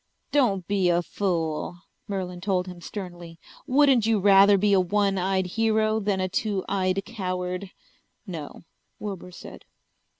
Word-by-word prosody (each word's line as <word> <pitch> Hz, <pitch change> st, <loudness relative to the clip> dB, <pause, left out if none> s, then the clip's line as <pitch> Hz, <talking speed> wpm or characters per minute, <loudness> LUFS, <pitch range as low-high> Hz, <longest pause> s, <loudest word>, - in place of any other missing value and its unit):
"Don't 205 Hz, -11 st, +2 dB
be 195 Hz, -3 st, +2 dB
a 175 Hz, 0 st, +2 dB
fool," 170 Hz, -2 st, -2 dB, 0.3 s
Merlin 185 Hz, -3 st, -4 dB
told 185 Hz, -1 st, 0 dB
him 180 Hz, -1 st, -9 dB
sternly. 175 Hz, -3 st, -8 dB, 0.3 s
"Wouldn't 265 Hz, -4 st, +4 dB
you 225 Hz, -2 st, +3 dB
rather 200 Hz, +1 st, +6 dB
be 205 Hz, +1 st, +2 dB
a 195 Hz, -, +5 dB
one 195 Hz, +1 st, +1 dB
eyed 190 Hz, 0 st, 0 dB
hero 220 Hz, +2 st, +1 dB
than 200 Hz, -2 st, -1 dB
a 185 Hz, -, 0 dB
two 200 Hz, 0 st, -2 dB
eyed 190 Hz, 0 st, 0 dB
coward?" 185 Hz, -3 st, -4 dB, 0.6 s
"No," 165 Hz, -7 st, -8 dB, 0.3 s
Wilbur 195 Hz, -3 st, -6 dB
said. 180 Hz, -, -11 dB
190 Hz, 140 wpm, -25 LUFS, 180-205 Hz, 0.6 s, rather